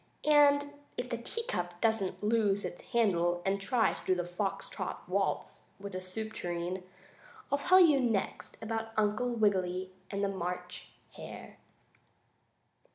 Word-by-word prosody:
And 285 Hz, -1 st, +5 dB, 0.2 s
if 245 Hz, 0 st, -3 dB
the 235 Hz, -, 0 dB
teacup 180 Hz, -, -3 dB
doesn't 220 Hz, -3 st, 0 dB
lose 210 Hz, -3 st, +2 dB
its 175 Hz, -1 st, -6 dB
handle 175 Hz, -8 st, +2 dB
and 195 Hz, +1 st, +1 dB
try 225 Hz, 0 st, +2 dB
to 185 Hz, -, 0 dB
do -, -, -3 dB
a 175 Hz, -, -1 dB
foxtrot 185 Hz, +3 st, -4 dB
waltz -, -, -1 dB, 0.2 s
with 200 Hz, 0 st, -7 dB
the 185 Hz, -, -3 dB
soup 220 Hz, +4 st, -5 dB
tureen, 175 Hz, +1 st, -3 dB, 0.7 s
I'll 280 Hz, -, +3 dB
tell 370 Hz, +5 st, +6 dB
you 310 Hz, -6 st, +7 dB
next 230 Hz, -6 st, -1 dB
about 225 Hz, 0 st, -3 dB
Uncle 215 Hz, +3 st, +2 dB
Wiggily 185 Hz, -5 st, +1 dB, 0.2 s
and 200 Hz, 0 st, -2 dB
the -, -, +3 dB
March 180 Hz, -2 st, -4 dB, 0.2 s
Hare. -, -, -10 dB
205 Hz, 140 wpm, -32 LUFS, 185-235 Hz, 0.7 s, you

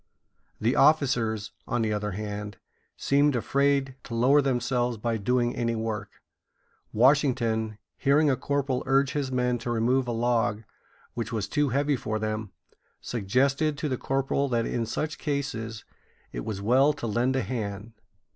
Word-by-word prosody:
The 115 Hz, +4 st, +1 dB
officers, 120 Hz, -8 st, +2 dB, 0.2 s
on 120 Hz, -, 0 dB
the 110 Hz, -1 st, 0 dB
other 105 Hz, -1 st, -2 dB
hand, 105 Hz, 0 st, -5 dB, 0.4 s
seemed 145 Hz, 0 st, +2 dB
afraid 140 Hz, +2 st, +1 dB
to 115 Hz, -, -6 dB
lower 135 Hz, +5 st, +5 dB
themselves 125 Hz, -2 st, 0 dB
by 115 Hz, +1 st, -1 dB
doing 120 Hz, +3 st, 0 dB
any 115 Hz, -1 st, -1 dB
work. 110 Hz, -2 st, -5 dB, 0.7 s
Washington, 115 Hz, -4 st, +2 dB, 0.2 s
hearing 145 Hz, +3 st, +3 dB
a 135 Hz, -, +3 dB
corporal 140 Hz, -1 st, -1 dB
urge 135 Hz, 0 st, +3 dB
his 140 Hz, -3 st, -2 dB
men 125 Hz, -1 st, 0 dB
to 120 Hz, -, -5 dB
remove 120 Hz, +3 st, +1 dB
a -, -, -1 dB
log 115 Hz, -2 st, 0 dB, 0.5 s
which 115 Hz, -1 st, -4 dB
was 110 Hz, -3 st, -2 dB
too 145 Hz, +5 st, +1 dB
heavy 140 Hz, +3 st, +1 dB
for 110 Hz, -3 st, -3 dB
them, 110 Hz, -1 st, -3 dB, 0.5 s
suggested 135 Hz, +7 st, 0 dB
to 150 Hz, -, -2 dB
the 130 Hz, -, -1 dB
corporal 135 Hz, +1 st, 0 dB
that 115 Hz, -2 st, +1 dB
in 115 Hz, -2 st, -2 dB
such 150 Hz, +6 st, -3 dB
cases 135 Hz, -7 st, -3 dB, 0.5 s
it -, -, -5 dB
was 100 Hz, -2 st, -4 dB
well 130 Hz, +7 st, +4 dB
to 145 Hz, -, -6 dB
lend 120 Hz, +4 st, +1 dB
a 130 Hz, -, +1 dB
hand. 105 Hz, -2 st, -5 dB
120 Hz, 155 wpm, -27 LUFS, 110-135 Hz, 0.7 s, lower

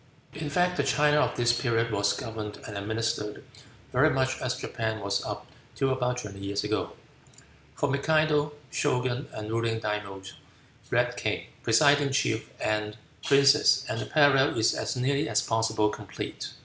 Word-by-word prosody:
In 150 Hz, 0 st, -5 dB
fact, 180 Hz, +4 st, +1 dB
the -, -, +2 dB
China 150 Hz, 0 st, +3 dB
of -, -, +1 dB
this 120 Hz, 0 st, +3 dB
period 115 Hz, -2 st, +1 dB
was 100 Hz, -1 st, +2 dB
governed 110 Hz, -3 st, -6 dB
and 105 Hz, -, -7 dB
administered 105 Hz, 0 st, -3 dB, 0.5 s
very -, -, +4 dB
much 130 Hz, 0 st, 0 dB
as 125 Hz, 0 st, -1 dB
Japan 110 Hz, -4 st, -3 dB
was 100 Hz, -1 st, -1 dB
up -, -, -5 dB, 0.3 s
till 135 Hz, -1 st, +1 dB
about 125 Hz, -1 st, -1 dB
twenty 105 Hz, -5 st, -7 dB
years 100 Hz, +1 st, -2 dB
ago. 105 Hz, +1 st, -2 dB, 0.8 s
For 145 Hz, -, 0 dB
Mikado, 150 Hz, +1 st, +2 dB, 0.2 s
Shogun, 125 Hz, +2 st, 0 dB
and 110 Hz, 0 st, -6 dB
ruling 115 Hz, 0 st, 0 dB
Daimios, 100 Hz, -3 st, -4 dB, 0.6 s
read -, -, +1 dB
king, -, -, -2 dB, 0.2 s
presiding 140 Hz, +4 st, +4 dB
chief, 115 Hz, -5 st, 0 dB
and 105 Hz, 0 st, -1 dB, 0.3 s
princes, 140 Hz, +1 st, +5 dB
and 115 Hz, -, -3 dB
the -, -, -5 dB
parallel 145 Hz, -4 st, +4 dB
is 110 Hz, -, +3 dB
as -, -, -3 dB
nearly 140 Hz, +4 st, 0 dB
as -, -, +2 dB
possible 110 Hz, -1 st, +1 dB
complete. -, -, -6 dB
120 Hz, 155 wpm, -27 LUFS, 110-140 Hz, 0.8 s, princes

